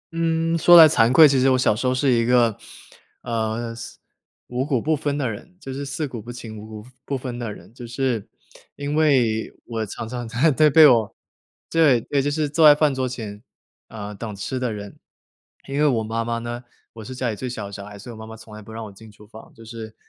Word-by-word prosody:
嗯， 165 0 0
说 175 +2 +8
来 160 -1 +11
惭 120 -6 +3
愧， 155 +3 +8
其 135 -2 +2
实 135 +1 +3
我 130 - +3
小 115 -4 +2
时 125 +3 -2
候 130 - +2
是 130 0 +1
一 115 -1 +2
个， 120 -3 +3 0.7
呃， 115 0 -3
四 120 +1 -10 0.5
五 125 +1 -3
谷 135 -4 0
不 155 +6 0
分 145 -1 -2
的 135 -4 -1
人， 180 - -11
就 135 -5 -8
是 140 +1 -5
四 145 +2 -3
谷 120 -4 -7
不 120 - -9
清， 115 -3 -9
五 110 - -10
谷 110 0 -10 0.2
不 140 -2 -3
分 125 -2 -6
的 115 -3 -4
人。 110 - -13
就 120 -1 -10
是 120 -3 -2 0.5
因 145 +1 -4
为 130 -8 +2
我 115 -2 -4
常 110 - -7
常 120 -1 -6
在 135 +8 +2
在 150 +2 +4
被 155 +2 +7
我 115 -6 +4 0.5
对， 150 -7 +4
对， 140 +3 -1
就 145 - -1
是 150 0 -1
坐 155 +2 +5
在 145 - +8
饭 150 -2 +2
桌 130 -1 -2
前， 110 -4 -7 0.5
呃， 105 -2 -8
等 105 0 -7
吃 130 +6 -4
的 125 -2 -2
人。 100 -1 -8 0.7
因 140 +1 -3
为 150 - +4
我 115 -5 +1
妈 115 +1 -2
妈 115 0 -2
呢 120 +1 -6 0.3
我 110 -1 -10
是 130 +3 -8
家 125 -2 -2
里 - - -5
最 130 +4 -5
小 110 -4 -6
的 100 - -9
小 100 0 -8
孩， 105 0 -11
所 120 +5 -10
以 - - -9
我 - - -12
妈 110 - -9
妈 110 - -9
从 105 0 -14
来 110 - -10
不 110 - -13
让 110 0 -7
我 100 - -10
进 110 +2 -15
厨 105 +1 -17
房， 110 +1 -14
就 115 -1 -14
是 110 -1 -9
120 Hz, 265 characters per minute, -22 LUFS, 110-140 Hz, 0.7 s, 来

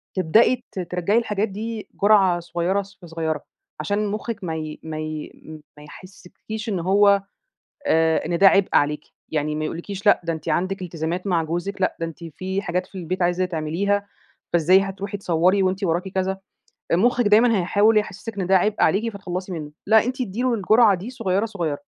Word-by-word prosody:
تبدئي 225 +8 +3
ت - - -6
ترَّجعي 180 +4 0
الحاجات 215 -2 0
دي 215 +2 -5
جرعة 195 -4 +5
صغيّرة 175 +3 -1
ص 200 +1 -15
في 175 - -12
صغيّرة، 160 -2 -3 0.4
عشان 205 +1 -1
مُخِّك 215 +1 -4
ما 160 -2 -3
ي 155 -1 -6
ما 155 -1 -5
ي 155 -1 -5 0.5
ما 150 - -12
يحسّسكيش 200 +6 -9
إن 195 -4 -1
هو 200 +3 +4 0.7
آآ 160 - +2
إن 170 - -1
ده 195 - +6
عبء 195 0 +3
عليكِ، 150 +1 +2 0.2
يعني 150 -1 -1
ما 155 0 -2
يقول 165 - -4
لكيش 200 +3 -7
لأ - - +6
ده 165 - -1
أنتِ 160 0 -7
عندِك 185 +4 -1
التزامات 170 +1 -4
مع 175 -4 +1
جوزِك، 175 +5 -4
لأ 185 - +1
ده 165 - -1
أنتِ 165 +1 -9
في 190 +5 -4
حاجات 180 +1 -2
في 195 - -10
البيت 180 +1 -3
عايزة 175 +1 +1
تعمليها، 185 +5 -1 0.5
فإزاي 175 +3 +5
هتروحي 195 +1 -4
تصوّري 185 +2 +2
وأنتِ 190 +1 0
وراكِ 175 +2 0
كذا، 190 0 -2 0.6
مُخِّك 240 +5 +3
دايمًا 225 +2 +5
هيحاول 205 +5 +3
يحسّسِك 210 +1 -3
إن 185 - -2
ده 190 0 +5
عبء 205 +3 +1
عليكِ 225 +4 +2
فاتخلّصي 185 -1 -5
منه، 155 -4 -6 0.2
لأ 220 0 +6
أنتِ 255 +2 -3
ادّي 225 -1 -3
له 255 -1 +1
الجرعة 215 0 +4
دي 190 +7 -7
صغيّرة، 200 -4 -1
صغيّرة، 170 -9 -3
190 Hz, 190 wpm, -22 LUFS, 170-205 Hz, 0.7 s, ده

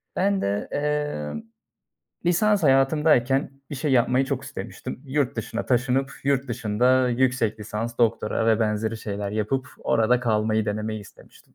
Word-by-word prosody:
Ben 195 +1 +1
de, 100 +1 -1
emm, 145 - -2 0.9
lisans 205 +2 +3
hayatımdayken 135 -1 +3 0.2
bir - - -4
şey 140 +1 -1
yapmayı 125 +1 +3
çok 135 -1 -3
istemiştim. 125 - -7
Yurt 135 -2 -1
dışına 115 +1 -4
taşınıp, 130 +2 +1
yurt 140 -1 +1
dışında 120 +3 +2
yüksek 120 -3 +1
lisans, 110 +3 -4
doktora 115 -1 +2
vb. 110 0 0
şeyler 100 -2 -4
yapıp 110 +5 -1
orada 120 +2 +2
kalmayı 110 -2 +1
denemeyi 110 +1 -3
istemiştim. 100 - -17
125 Hz, 130 wpm, -24 LUFS, 110-135 Hz, 0.9 s, lisans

